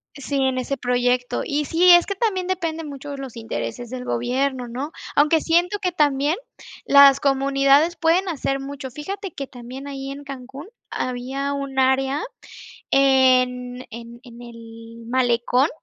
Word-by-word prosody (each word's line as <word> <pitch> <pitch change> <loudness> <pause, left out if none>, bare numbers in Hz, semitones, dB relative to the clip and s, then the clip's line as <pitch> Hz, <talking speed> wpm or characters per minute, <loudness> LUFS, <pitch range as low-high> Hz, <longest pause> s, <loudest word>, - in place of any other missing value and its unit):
Sí, 280 0 -5
en 260 -1 0
ese 275 +2 -3
proyecto. 245 0 0
Y 295 +1 -1
sí, 345 +5 +3
es 350 0 +7
que 400 - -3
también 385 -3 -1
depende 335 -3 -3
mucho 290 -1 -8
de 280 - -6
los 265 -3 -8
intereses 235 +1 -5
del 250 0 -6
gobierno, 250 +1 -1
¿no? 265 +6 -5 0.2
Aunque 305 +2 +4
siento 350 +5 +1
que 365 -2 -1
también, 295 -1 +1 0.5
las 280 -1 +7
comunidades 275 +4 +3
pueden 350 +3 +2
hacer 275 -3 -2
mucho. 275 -1 -7
Fíjate 380 - -6
que 275 -2 -6
también 255 +3 -9
ahí 275 -1 -6
en 285 +1 -8
Cancún, 275 +3 -9 0.2
había 265 +3 -3
un 275 -1 -3
área 265 +2 +2 0.7
en 255 -2 +3
en 235 +1 -10
en 240 -2 -14
el 230 0 -12
Malecón, 245 +2 +2
275 Hz, 150 wpm, -22 LUFS, 250-295 Hz, 0.7 s, es